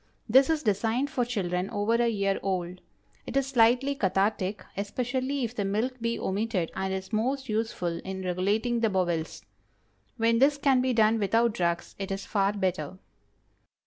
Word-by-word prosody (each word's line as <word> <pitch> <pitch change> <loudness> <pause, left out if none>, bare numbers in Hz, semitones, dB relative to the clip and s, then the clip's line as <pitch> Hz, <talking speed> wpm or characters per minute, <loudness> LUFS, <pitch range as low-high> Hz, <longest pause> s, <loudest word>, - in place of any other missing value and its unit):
This 265 +5 +5
is 315 -2 +1
designed 225 +6 0
for 250 - +1
children 190 -6 -2
over 205 +2 0
a 235 0 +3
year 200 -3 0
old. 180 -2 -3 0.5
It - - -2
is 275 - +2
slightly 255 +1 +3
cathartic; 195 -2 0
especially 255 +7 -2
if 235 0 -3
the 205 - -1
milk 225 +6 -1
be 230 0 -1
omitted, 195 -3 -1
and 190 0 -2
is 190 +3 -5
most 260 +5 0
useful 215 -6 -2
in 190 +1 -6
regulating 205 +7 0
the 225 -1 +2
bowels. 175 -4 -2 0.7
When 230 0 +2
this 280 +2 +4
can 275 -3 +3
be 255 0 +1
done 220 0 +3
without 225 +3 +2
drugs, 170 -2 -1
it 195 - -4
is 195 0 -4
far 200 -1 +1
better. 185 -4 -2
215 Hz, 165 wpm, -27 LUFS, 190-245 Hz, 0.7 s, This